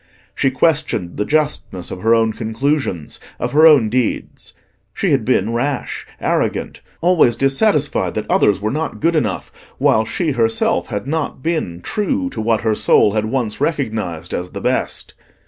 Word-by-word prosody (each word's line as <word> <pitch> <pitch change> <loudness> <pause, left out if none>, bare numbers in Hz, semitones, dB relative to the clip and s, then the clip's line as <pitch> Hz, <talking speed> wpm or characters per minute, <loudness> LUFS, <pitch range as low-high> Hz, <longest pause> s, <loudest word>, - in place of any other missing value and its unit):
She 135 - +1
questioned 130 - 0
the 105 - 0
justness 150 - -1
of 90 - -6
her 115 +1 +4
own 110 -1 +2
conclusions, 110 - -2 0.2
of - - -2
her 155 +3 +7
own 145 -8 +6
deeds: 125 +2 -2 0.4
she - - 0
had - - +2
been 110 +4 +1
rash, 135 +3 -3
arrogant, - - -1 0.2
always 165 -9 +4
dissatisfied 145 - +1
that - - -2
others 100 -2 +3
were 105 +2 -2
not 155 +4 -3
good 165 +2 +1
enough, 105 - -1 0.3
while 110 - +3
she 160 - -2
herself 115 -3 +1
had 105 - -4
not 145 -2 -3
been 155 - -2
true 240 +6 -1
to - - -4
what 110 0 +1
her 110 -1 +1
soul 105 -1 +3
had 110 0 0
once 115 -1 -2
recognised 110 - -2
as 90 0 -3
the - - -7
best. - - -1
120 Hz, 165 wpm, -18 LUFS, 110-150 Hz, 0.4 s, her